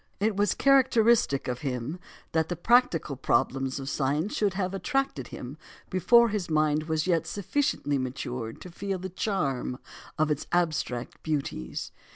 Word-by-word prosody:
It 210 Hz, +1 st, +1 dB
was 205 Hz, +1 st, +2 dB
characteristic 235 Hz, -, +4 dB
of 125 Hz, -1 st, -2 dB
him 130 Hz, +5 st, -3 dB, 0.3 s
that 160 Hz, -1 st, +1 dB
the 175 Hz, -, -1 dB
practical 175 Hz, -, +3 dB
problems 130 Hz, +1 st, 0 dB
of 135 Hz, -, -6 dB
science 145 Hz, +7 st, 0 dB
should 200 Hz, -3 st, +1 dB
have 190 Hz, -1 st, -1 dB
attracted 270 Hz, -, -1 dB
him 135 Hz, +5 st, -8 dB, 0.3 s
before 230 Hz, +6 st, +5 dB
his 200 Hz, -5 st, -2 dB
mind 155 Hz, 0 st, +2 dB
was 160 Hz, -1 st, 0 dB
as -, -, -5 dB
yet 165 Hz, -3 st, +1 dB
sufficiently 200 Hz, -, 0 dB
matured 125 Hz, -3 st, -4 dB
to 180 Hz, -, -9 dB
feel 195 Hz, +2 st, -3 dB
the 185 Hz, +1 st, -6 dB
charm 140 Hz, -, -1 dB, 0.4 s
of 155 Hz, 0 st, +2 dB
its 150 Hz, -, -2 dB
abstract 155 Hz, -8 st, -1 dB
beauties. 140 Hz, -, -3 dB
160 Hz, 155 wpm, -28 LUFS, 135-200 Hz, 0.4 s, before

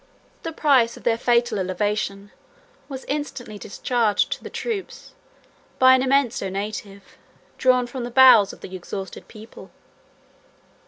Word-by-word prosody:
The 330 Hz, -, -5 dB
price 270 Hz, -7 st, +2 dB
of -, -, -14 dB
their 235 Hz, -1 st, +2 dB
fatal 240 Hz, -3 st, +1 dB
elevation 200 Hz, +2 st, -2 dB, 0.6 s
was 265 Hz, -2 st, -7 dB
instantly 260 Hz, -7 st, -5 dB
discharged 220 Hz, +1 st, 0 dB
to -, -, -4 dB
the -, -, -7 dB
troops 435 Hz, -5 st, -6 dB, 0.6 s
by 260 Hz, 0 st, +7 dB
an 260 Hz, -, +4 dB
immense 265 Hz, -2 st, +1 dB
donative, 200 Hz, +1 st, -5 dB, 0.6 s
drawn 255 Hz, -1 st, +3 dB
from 245 Hz, +1 st, -6 dB
the 240 Hz, -, -4 dB
bowels 245 Hz, -5 st, +7 dB
of -, -, -15 dB
the 190 Hz, -, -8 dB
exhausted 190 Hz, +1 st, -7 dB
people. 220 Hz, +1 st, -13 dB
235 Hz, 130 wpm, -23 LUFS, 205-260 Hz, 0.6 s, by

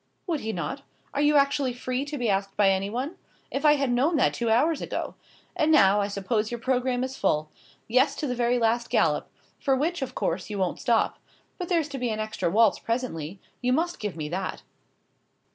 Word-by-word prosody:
"Would 330 Hz, -5 st, -1 dB
he 220 Hz, -, -3 dB
not? 220 Hz, +9 st, -4 dB, 0.3 s
Are 285 Hz, -, 0 dB
you 295 Hz, 0 st, +4 dB
actually 280 Hz, -2 st, +3 dB
free 255 Hz, +2 st, -3 dB
to 290 Hz, 0 st, -5 dB
be 245 Hz, -3 st, -1 dB
asked 195 Hz, -1 st, -1 dB
by 200 Hz, -2 st, +5 dB
anyone? 225 Hz, -, -2 dB, 0.3 s
If 275 Hz, -, -2 dB
I 300 Hz, 0 st, +7 dB
had 275 Hz, -3 st, 0 dB
known 275 Hz, +8 st, +2 dB
that 295 Hz, -, +3 dB
two 235 Hz, -1 st, -1 dB
hours 285 Hz, +8 st, +3 dB
ago! -, -, -4 dB, 0.4 s
And 310 Hz, +1 st, +2 dB
now, 205 Hz, -9 st, +6 dB
I 200 Hz, -, 0 dB
suppose 210 Hz, +2 st, -1 dB
your 240 Hz, -, -4 dB
programme 250 Hz, 0 st, 0 dB
is 260 Hz, 0 st, -4 dB
full. 155 Hz, -, 0 dB, 0.4 s
Yes, 260 Hz, +5 st, +3 dB
to -, -, -3 dB
the 250 Hz, -, -1 dB
very 245 Hz, 0 st, +1 dB
last 235 Hz, 0 st, +1 dB
galop; -, -, +2 dB, 0.3 s
for 270 Hz, -2 st, +2 dB
which, 325 Hz, +5 st, -1 dB
of 265 Hz, -, -4 dB
course, 175 Hz, +4 st, -2 dB
you 210 Hz, -, -4 dB
won't 185 Hz, -2 st, -1 dB
stop. 230 Hz, -2 st, +1 dB, 0.4 s
But 360 Hz, -, -4 dB
there's 335 Hz, -4 st, +2 dB
to 275 Hz, -1 st, -5 dB
be 245 Hz, -1 st, -1 dB
an 215 Hz, -1 st, -2 dB
extra 215 Hz, -5 st, -1 dB
waltz 215 Hz, +3 st, +4 dB
presently. 200 Hz, -8 st, -3 dB, 0.2 s
You 250 Hz, 0 st, +2 dB
must 340 Hz, +5 st, 0 dB
give 210 Hz, -3 st, -4 dB
me 155 Hz, -2 st, -4 dB
that." 185 Hz, +4 st, -4 dB
245 Hz, 210 wpm, -26 LUFS, 205-280 Hz, 0.4 s, I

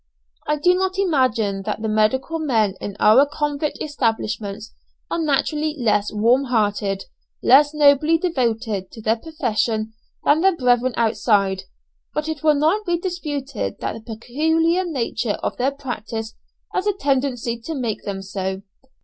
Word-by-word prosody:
I 300 Hz, -, +2 dB
do 355 Hz, +5 st, +3 dB
not 375 Hz, +1 st, -1 dB
imagine 255 Hz, -, +1 dB
that 220 Hz, -, -3 dB
the -, -, 0 dB
medical 220 Hz, +9 st, +1 dB
men 225 Hz, -10 st, +1 dB
in 205 Hz, -1 st, -6 dB
our 220 Hz, +6 st, +7 dB
convict 295 Hz, 0 st, -2 dB
establishments 220 Hz, -6 st, -2 dB, 0.4 s
are -, -, 0 dB
naturally 305 Hz, 0 st, 0 dB
less 210 Hz, -5 st, +1 dB
warm 235 Hz, +6 st, +3 dB
hearted, 205 Hz, -5 st, 0 dB, 0.4 s
less 290 Hz, +3 st, +6 dB
nobly 300 Hz, +1 st, +4 dB
devoted 230 Hz, -, -1 dB
to 225 Hz, -, -9 dB
their 220 Hz, +2 st, +2 dB
profession 225 Hz, -6 st, -2 dB, 0.3 s
than 300 Hz, +2 st, +4 dB
their 385 Hz, -1 st, +4 dB
brethren 250 Hz, -3 st, +2 dB
outside, 205 Hz, -4 st, +1 dB, 0.5 s
but 300 Hz, +1 st, -1 dB
it 315 Hz, -2 st, -4 dB
will 305 Hz, -1 st, +4 dB
not 320 Hz, +9 st, +2 dB
be 345 Hz, -3 st, 0 dB
disputed 295 Hz, -, -4 dB
that -, -, -2 dB
the 225 Hz, -, -9 dB
peculiar 320 Hz, +9 st, +1 dB
nature 245 Hz, -, -2 dB
of -, -, -1 dB
their 255 Hz, +2 st, +2 dB
practice 225 Hz, -5 st, -5 dB, 0.4 s
has 375 Hz, -, -1 dB
a 415 Hz, -, +3 dB
tendency 260 Hz, -, -1 dB
to 315 Hz, +7 st, -5 dB
make 235 Hz, -6 st, -3 dB
them 195 Hz, -1 st, -4 dB
so. 190 Hz, 0 st, -4 dB
255 Hz, 150 wpm, -21 LUFS, 220-305 Hz, 0.5 s, our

